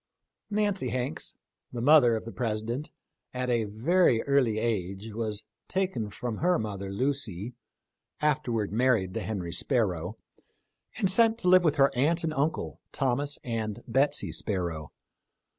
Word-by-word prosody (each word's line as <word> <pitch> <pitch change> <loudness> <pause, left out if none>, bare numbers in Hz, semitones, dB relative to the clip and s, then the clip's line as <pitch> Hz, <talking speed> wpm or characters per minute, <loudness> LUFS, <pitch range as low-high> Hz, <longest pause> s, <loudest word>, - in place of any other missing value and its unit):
13 210 0 +1
Nancy 190 -11 0
Hanks, 120 -8 -3 0.4
the 120 - -5
mother 125 -2 +6
of 110 - -4
the 115 - -6
President, 115 +4 -3 0.5
at 125 0 -1
a 115 -2 +2
very 120 - +2
early 135 -6 +2
age 105 -1 -2
was 110 -2 -3 0.2
taken 185 - -1
from 115 +2 -4
her 180 +1 +2
mother 100 -4 -4
Lucy 120 -3 -2 0.3
— - - -58 0.2
afterwards 130 -9 0
married 115 -6 +2
to - - -2
Henry 90 -6 -4
Sparrow 95 - 0 0.4
— - - -26
and 195 - +2
sent 225 +4 +4
to 205 - -3
live 185 0 +7
with 155 -3 +3
her 135 -2 +3
aunt 160 +7 +2
and 160 -1 -1
uncle, 150 +2 -2
Thomas 140 +2 0
and 110 -3 -3
Betsy 145 +2 +1
Sparrow. 85 -7 -2
120 Hz, 150 wpm, -28 LUFS, 105-145 Hz, 0.5 s, live